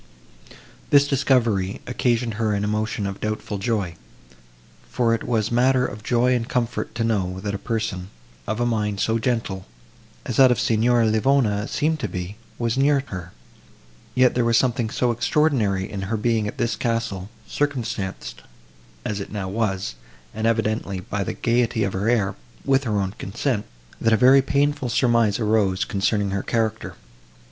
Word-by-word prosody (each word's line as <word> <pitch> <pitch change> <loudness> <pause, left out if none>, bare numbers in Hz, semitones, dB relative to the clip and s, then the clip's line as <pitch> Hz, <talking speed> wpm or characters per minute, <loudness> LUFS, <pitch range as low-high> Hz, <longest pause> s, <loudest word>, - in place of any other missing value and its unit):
This 145 0 +5
discovery 120 -9 +1
occasioned 120 -2 0
her 110 -1 +1
an 100 - -1
emotion 105 0 -1
of 100 0 -5
doubtful 110 -1 -3
joy; 100 -6 -1 0.9
for 120 -2 +1
it 115 - -1
was 115 -2 0
matter 125 +2 +3
of 105 -3 -6
joy 125 +2 +2
and 120 0 -1
comfort 120 -3 -2
to 115 - -1
know, 95 -5 -1
that 100 0 -3
a 100 - -3
person, 110 -6 -3 0.4
of 110 +2 -2
a 120 - +1
mind 105 -4 -1
so 115 +2 +1
gentle, 110 - -2 0.6
as - - -3
that 130 -1 +8
of 125 - +2
Signora 115 +1 +3
Livona 110 -1 +2
seemed 155 +1 0
to - - -2
be, 90 +2 -5 0.2
was 120 +2 -1
near 140 0 +3
her; 90 -3 -7 0.8
yet 130 -1 +4
there 120 - +1
was 115 0 +3
something 120 -3 +1
so 120 +1 +1
extraordinary 120 -6 +1
in 100 - -5
her 105 +4 -2
being 110 -1 +1
at - - -6
this 115 - 0
castle, 115 -5 -2 0.2
circumstanced 120 -9 -3 0.6
as 105 -1 -2
it 100 - -7
now 100 -2 -3
was, 95 - -1 0.4
and 110 +1 -1
evidently, 110 -4 0
by 100 +2 -3
the - - -3
gaiety 115 -2 +1
of 100 - -1
her 100 +4 0
air, 105 -5 +2 0.3
with 135 0 +2
her 105 -3 0
own 95 -1 -1
consent, 105 +3 -2 0.4
that 115 - +3
a - - +5
very 130 +4 +6
painful 140 -1 0
surmise 115 -4 +2
arose, 105 -4 +1
concerning 100 0 0
her 100 0 -1
character. 110 0 -2
115 Hz, 165 wpm, -23 LUFS, 100-120 Hz, 0.9 s, that